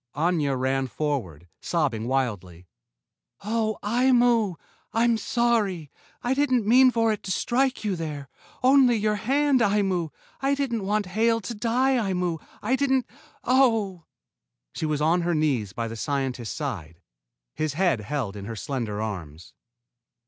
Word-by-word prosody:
Aña 150 -4 +1
ran 130 +1 0
forward, 120 - -3
sobbing 135 -10 -1
wildly. 100 -10 -2 0.8
"Oh, 220 0 -1
Aimu! 240 -3 +3 0.4
I'm 230 +1 +3
sorry! 220 - 0 0.3
I 245 - +1
didn't 260 -5 +1
mean 255 +4 +6
for 225 -2 +2
it 210 - -6
to 190 - -5
strike 255 +6 0
you 200 -3 0
there. 150 -4 -5 0.4
Only 260 -2 +5
your 215 -1 0
hand, 275 +4 +2
Aimu! 195 -6 +1 0.3
I 275 +1 +2
didn't 235 -8 -2
want 210 0 +1
Hale 225 +5 +1
to 235 - -5
die, 245 +4 +1
Aimu. 180 -6 -1 0.2
I 240 +5 +2
didn't 265 -2 +1 0.4
oh!" 225 -9 +2 0.7
She 160 - -3
was 150 -1 -1
on 165 +3 +3
her 170 0 0
knees 135 -10 0
by 115 +4 -3
the 115 - -6
scientist's 130 -2 -3
side, 90 - -5 0.5
his 155 -2 -2
head 175 - +1
held 120 -4 -3
in 100 -1 -7
her 115 +2 -6
slender 110 -3 -3
arms. 85 -6 -7
185 Hz, 140 wpm, -25 LUFS, -, 0.8 s, mean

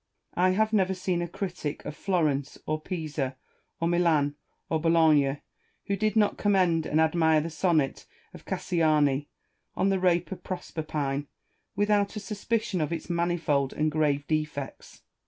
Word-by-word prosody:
I 185 +1 +3
have 220 +3 +1
never 190 -2 +2
seen 180 -1 -1
a 175 - -2
critic 175 -4 -5
of 150 - -5
Florence, 150 -8 0
or 155 0 -2
Pisa, 155 -6 -3 0.4
or 165 - +1
Milan, 165 -4 +2 0.3
or 160 -1 -1
Bologna, 155 -4 +3 0.4
who 200 - 0
did 215 +1 0
not 210 -2 +2
com 205 -1 +2
mend 170 -4 +2
and 155 - +1
admire 160 -1 +4
the 165 +2 -3
sonnet 160 -4 0 0.3
of - - -12
Cassiani 150 -4 +1 0.5
on 195 - +2
the 195 -1 +1
rape 180 -1 +2
of 190 - -6
Proserpine, 150 -5 -3 0.5
without 205 0 +2
a - - -3
suspicion 210 -2 -2
of 155 - -1
its 170 +1 -4
manifold 170 -5 0
and 155 0 0
grave 145 -2 +1
defects. 150 -3 -4
165 Hz, 155 wpm, -27 LUFS, 150-185 Hz, 0.5 s, admire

